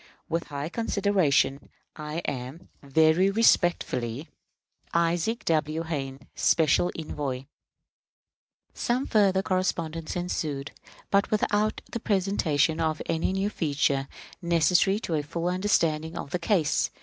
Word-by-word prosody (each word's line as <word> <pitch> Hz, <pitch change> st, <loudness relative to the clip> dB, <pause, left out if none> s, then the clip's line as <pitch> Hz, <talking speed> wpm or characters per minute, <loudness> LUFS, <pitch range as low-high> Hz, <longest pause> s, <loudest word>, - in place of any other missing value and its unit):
With 165 Hz, +1 st, -2 dB
high 145 Hz, 0 st, -5 dB
consideration, 185 Hz, -, +1 dB, 0.3 s
I 155 Hz, +2 st, -5 dB
am, 130 Hz, +5 st, -5 dB
very 160 Hz, +6 st, +3 dB
respectfully, 170 Hz, -, +1 dB, 0.7 s
ISAAC 170 Hz, +7 st, +1 dB
W. 155 Hz, 0 st, 0 dB
HAYNE, 135 Hz, -4 st, -4 dB
Special 160 Hz, +2 st, +3 dB
Envoy. 145 Hz, -5 st, -4 dB, 1.3 s
Some 250 Hz, +3 st, -1 dB
further 195 Hz, -3 st, +3 dB
correspondence 165 Hz, -4 st, -2 dB
ensued, 150 Hz, -5 st, -3 dB, 0.4 s
but 200 Hz, 0 st, +3 dB
without 210 Hz, 0 st, +1 dB
the 235 Hz, -, -3 dB
presentation 180 Hz, -7 st, +1 dB
of 155 Hz, -1 st, 0 dB
any 165 Hz, +2 st, 0 dB
new 195 Hz, +2 st, -1 dB
feature 140 Hz, -5 st, 0 dB, 0.3 s
necessary 175 Hz, +3 st, +3 dB
to 170 Hz, -, -3 dB
a 155 Hz, -, +1 dB
full 170 Hz, +4 st, -4 dB
understanding 170 Hz, -4 st, 0 dB
of 140 Hz, -, -6 dB
the 180 Hz, -, -1 dB
case. 170 Hz, -3 st, +1 dB
165 Hz, 115 wpm, -27 LUFS, 150-190 Hz, 1.3 s, very